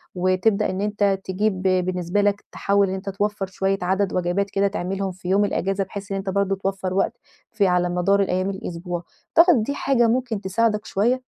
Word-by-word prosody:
وتبدأ 185 +3 +2
إن 190 +1 -3
أنت 205 -2 +1
تجيب 190 0 -1
بالنسبة 185 0 +1
لك 205 0 0
تحاول 200 -1 +1
إن 190 - -2
أنت 195 +1 -5
توفر 205 0 -1
شويّة 195 +1 -1
عدد 190 +1 0
وجبات 185 +3 0
كده 200 0 +1
تعملهم 195 0 -3
في 180 0 -8
يوم 200 +2 +4
الأجازة، 195 0 -1
بحيث 200 +2 -8
إن 195 - -1
أنت 195 0 -4
برضو 195 0 +1
توفر 195 -1 -3
وقت 195 - 0 0.3
في 210 -4 +2
على 180 -1 +2
مدار 180 +3 +2
الأيّام 185 0 0
الأسبوع. 175 -2 -5 0.3
تعتقد 330 -8 +6
دي 280 +6 -3
حاجة 245 -5 +2
ممكن 235 -3 0
تساعدك 210 +2 0
شوية؟ 245 +6 0
195 Hz, 185 wpm, -23 LUFS, 185-205 Hz, 0.3 s, تعتقد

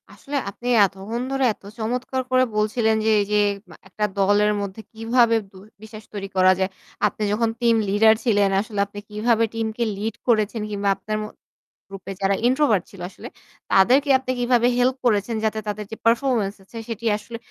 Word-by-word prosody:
আসলে 285 0 -8
আপনি 240 +5 -9 0.2
এতক্ষণ 195 +5 -5
ধরে 270 0 0
এত - - -31 0.2
চমৎকার 250 +3 -2
করে 255 0 +4
বলছিলেন। 220 +1 +1
যে - - +3
এই 205 - +1
যে 210 - +3 0.3
মা - - -13
একটা 210 +3 -2
দলের 205 +2 +3
মধ্যে 200 +2 -6
কিভাবে 230 +1 +2 0.2
বু 190 - -15 0.2
বিশ্বাস 215 0 -11
তৈরি 195 -1 -5
করা 185 0 +6
যায়। 190 0 +1 0.4
আপনি 215 - -5
যখন 225 +2 +1
টিম 235 -1 +4
লিডার 220 +2 +5
ছিলেন 205 -4 +3
আসলে 210 -1 -6
আপনি 205 +1 -10
কিভাবে 225 +2 +1
টিমকে 225 +1 -2
লিড 215 +2 -3
করেছেন 220 -1 +1
কিংবা 200 -1 -1
আপনার 215 0 -4
ম - - -4 0.7
গ্রুপ 195 - -9
এ - - -4
যারা 195 +1 +3
ইন্ট্রোভার্ট 250 - +2
ছিল 195 - -12
আসলে - - -11 0.5
তাদেরকে 255 +9 +4
আপনি 260 0 -4
কিভাবে 245 -1 +3
হেল্প 255 +1 +2
করেছেন 220 0 +1
যাতে 220 0 0
তাদের 210 0 -4
যে 225 - -6
পারফরম্যান্স 230 -4 +1
আছে 210 +4 -12
সেটি 230 0 -5
আসলে 215 +2 -9
220 Hz, 180 wpm, -22 LUFS, 205-235 Hz, 0.7 s, করা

